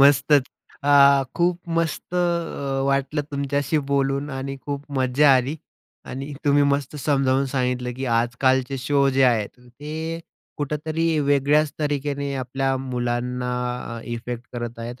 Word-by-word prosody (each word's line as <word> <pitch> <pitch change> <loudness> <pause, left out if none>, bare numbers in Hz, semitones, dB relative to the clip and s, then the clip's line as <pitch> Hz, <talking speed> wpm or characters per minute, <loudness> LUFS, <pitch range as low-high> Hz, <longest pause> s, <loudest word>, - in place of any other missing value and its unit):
मस्तच. 140 0 +5 0.4
अ, 140 -1 +6
खूप 175 0 +1 0.2
मस्त 165 +2 -2
अ, 170 -6 -1
वाटलं 140 +2 0
तुमच्याशी 140 +2 0
बोलून 140 +1 0
आणि 135 +1 -4
खूप 145 0 -4
मजा 130 +3 +4
आली 130 +5 -1 0.5
आणि 135 +3 -6
तुम्ही 145 0 +4
मस्त 140 0 0
समजावून 135 -2 +1
सांगितलं, 125 -1 -1
की 135 - -3
आजकालचे 125 +3 +1
शो 140 +2 +2
जे 135 - +5
आहेत, 115 -5 +2
ते 155 +7 -6 0.4
कुठेतरी 155 +2 -1
वेगळ्याच 145 +1 +2
तरिकेने 145 -1 -2
आपल्या 135 +1 -1
मुलांना 125 -1 -2 0.5
अ, - - -7
इफेक्ट 120 0 -5
करत 120 -1 -5
आहेत 120 +2 -7
140 Hz, 130 wpm, -23 LUFS, 125-145 Hz, 0.5 s, अ